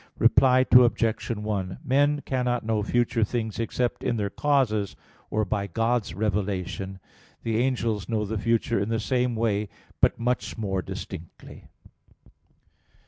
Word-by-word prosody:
Reply 130 +2 +5
Obj. 120 -2 +4
1: 105 -4 -2
Men 145 +2 +2
cannot 125 -4 -1
know 110 -1 +1
future 120 +1 +1
things 110 -1 -2
except 120 +1 -1
in 120 - 0
their 100 -2 -2
causes, 125 -9 +1 0.3
or 110 0 0
by 100 -1 -2
God's 115 -2 0
revelation. 95 -2 -2 0.4
The 115 -1 0
angels 115 -4 0
know 110 -2 0
the 110 +1 -3
future 115 0 +1
in 100 +2 -1
the 115 -1 0
same 125 +1 0
way, 105 -2 0 0.3
but - - +3
much 125 +1 -1
more 95 -4 -1
distinctly. 85 -2 -9
110 Hz, 135 wpm, -26 LUFS, 105-120 Hz, 0.4 s, Reply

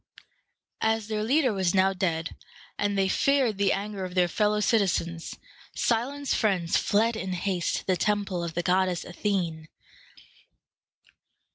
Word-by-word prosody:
As 220 -1 0
their 215 -1 -1
leader 260 +1 +2
was 190 -2 0
now 190 0 +4
dead, 165 -4 -2 0.4
and 205 -1 -1
they 195 -1 +2
feared 255 -1 +2
the 200 - +3
anger 200 -1 -3
of 180 0 -6
their 180 -1 +4
fellow 210 +3 +1
citizens, 170 -6 0 0.4
Cylon's 265 +4 0
friends 185 -6 +1
fled 225 +3 +2
in 190 -4 -3
haste 180 -1 -1
to - - -5
the 185 -1 +1
temple 200 -3 -1
of 170 -1 -5
the 175 - -1
goddess 180 0 +1
Athene. 175 -5 -2
195 Hz, 140 wpm, -27 LUFS, 180-215 Hz, 0.4 s, now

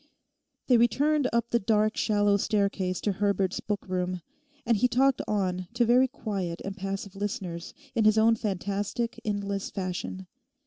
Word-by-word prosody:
They 250 - +5
returned 280 +5 +3
up 235 0 0
the 235 - +3
dark 215 +1 +2
shallow 205 -2 +2
staircase 200 -3 0
to 205 - +1
Herbert's 195 -1 0
book 205 -2 -4
room, 180 -1 -2 0.4
and 230 -1 +3
he 250 - +3
talked 265 +2 +2
on 185 -3 -1
to 240 0 +3
very 250 +3 +5
quiet 195 -8 -4
and 195 0 -4
passive 195 0 -5
listeners 185 -4 -4 0.2
in 220 - +2
his 215 0 +5
own 225 +1 +5
fantastic 205 +3 -2
endless 200 -2 -2
fashion. 185 0 -4
205 Hz, 150 wpm, -28 LUFS, 190-230 Hz, 0.4 s, They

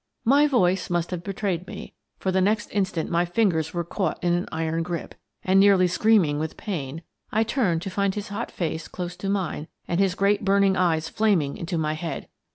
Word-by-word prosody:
My 285 +5 +5
voice 190 -9 +2
must 175 0 -1
have 175 -2 -4
betrayed 190 -3 -2
me, - - -8 0.2
for 190 - -1
the 190 0 +2
next 210 +2 +1
instant 190 -5 -1
my 170 +1 +3
fingers 175 -4 +1
were 175 0 -2
caught 170 0 -2
in 175 -1 +2
an 175 +1 0
iron 160 0 -1
grip, 170 0 -4 0.3
and, 190 +1 +4
nearly 195 -2 +6
screaming 180 -5 +3
with 155 0 -4
pain, 160 -6 -5 0.3
I 220 +1 +3
turned 215 -9 0
to 195 - -4
find 200 0 0
his 205 -1 -5
hot 210 +4 -4
face 160 -2 -3
close 180 -1 -5
to 195 - -3
mine 185 -6 -2 0.2
and 175 - 0
his 195 -2 +2
great 200 +1 +2
burning 195 -1 +3
eyes 165 -4 +1
flaming 180 -9 +1
into 170 +1 -3
my 155 -1 0
head. 160 +1 -5
180 Hz, 200 wpm, -25 LUFS, 165-200 Hz, 0.3 s, nearly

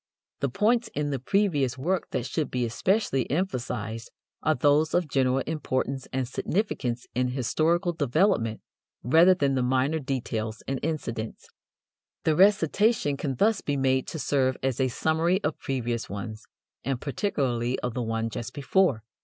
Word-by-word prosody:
The 140 - 0
points 225 - +2
in 145 0 -1
the 135 - -1
previous 145 - +1
work 175 +8 -1
that 120 - -2
should 150 0 -2
be 125 -1 -1
especially 135 - 0
emphasized 120 - -2 0.3
are 155 - +2
those 145 +4 +3
of 175 -2 +2
general 130 -1 +1
importance 135 -4 -2
and 130 -1 -1
significance 130 - -2
in 125 +1 +1
historical 160 +8 +1
development 145 - +1 0.4
rather 165 +8 +6
than 140 -6 +1
the 130 - +1
minor 130 +5 +1
details 120 -5 -3
and 135 -1 -1
incidents. 115 -8 -4 0.7
The 155 - +2
recitation 195 -2 +3
can 135 -1 -3
thus 210 - +2
be 145 -1 -1
made 130 -1 +1
to - - -5
serve 130 -3 +1
as 130 -1 0
a 130 - +3
summary 160 +7 +1
of 150 - -1
previous 120 -3 -2
ones, 110 +2 -6 0.4
and 135 -1 -1
particularly 130 - -1
of 125 -2 -2
the 125 - -2
one 115 0 -2
just 120 +3 -6
before. 145 - +2
135 Hz, 155 wpm, -27 LUFS, 125-160 Hz, 0.7 s, rather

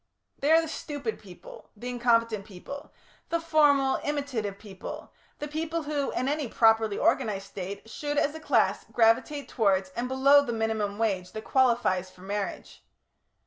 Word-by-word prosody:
They 285 - 0
are 325 +1 +6
the - - -4
stupid 290 -7 -5
people, 185 -4 -13
the 240 - -7
incompetent 230 -3 +1
people, 225 +9 -10 0.4
the 335 - +1
formal, 290 -5 +3
imitative 270 -9 -2
people, 195 -3 -9 0.2
the 295 - -5
people 320 +2 -3
who, 290 -2 -1
in 255 - -1
any 295 -1 -1
properly 225 -2 +3
organised 195 -3 +1
State, 200 +3 -7
should, 290 +5 -4
as 290 +1 +2
a 320 - -7
class, 315 - +2
gravitate 245 +5 +2
towards 195 -5 +1
and 240 +5 -3
below 275 +2 +5
the 240 -4 -3
minimum 220 -2 -1
wage 190 -5 -1
that 220 - -6
qualifies 235 -9 +2
for 180 - -19
marriage. 200 +1 -5
235 Hz, 155 wpm, -27 LUFS, 205-285 Hz, 0.4 s, are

